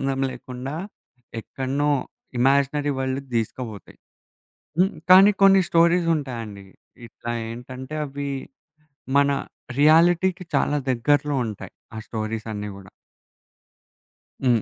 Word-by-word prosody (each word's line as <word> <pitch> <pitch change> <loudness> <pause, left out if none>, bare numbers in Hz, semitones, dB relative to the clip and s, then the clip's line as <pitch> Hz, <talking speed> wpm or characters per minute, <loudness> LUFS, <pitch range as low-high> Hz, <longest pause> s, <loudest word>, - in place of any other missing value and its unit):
సంబంధం 135 -1 -1
లేకుండా, 130 +3 -7 0.7
ఎక్కడనో 135 +5 -2 0.5
ఇమాజినరీ 140 +3 +2
వరల్డ్‌కి 130 +1 -3
దీసుకోబోతాయి. 110 -3 -4 0.8
హ్మ్. 190 +3 +3 0.2
కానీ, 190 +3 +9
కొన్ని 195 -1 +7
స్టోరీసుంటాయండి. 150 - +1 0.4
ఇట్లా 120 0 -7 0.2
ఏంటంటే, 130 +4 -8
అవి 140 0 -5 0.9
మన 140 - +5 0.5
రియాలిటీకి 175 +4 +4
చాలా 145 +1 +2
దగ్గరలో 145 +3 +1
ఉంటాయి. 105 -3 -7 0.2
ఆ - - -5
స్టోరీసన్నీ 110 -1 -4
గూడా. 95 -2 -13 1.5
హ్మ్. 120 -4 +3
135 Hz, 90 wpm, -23 LUFS, 120-155 Hz, 1.5 s, కానీ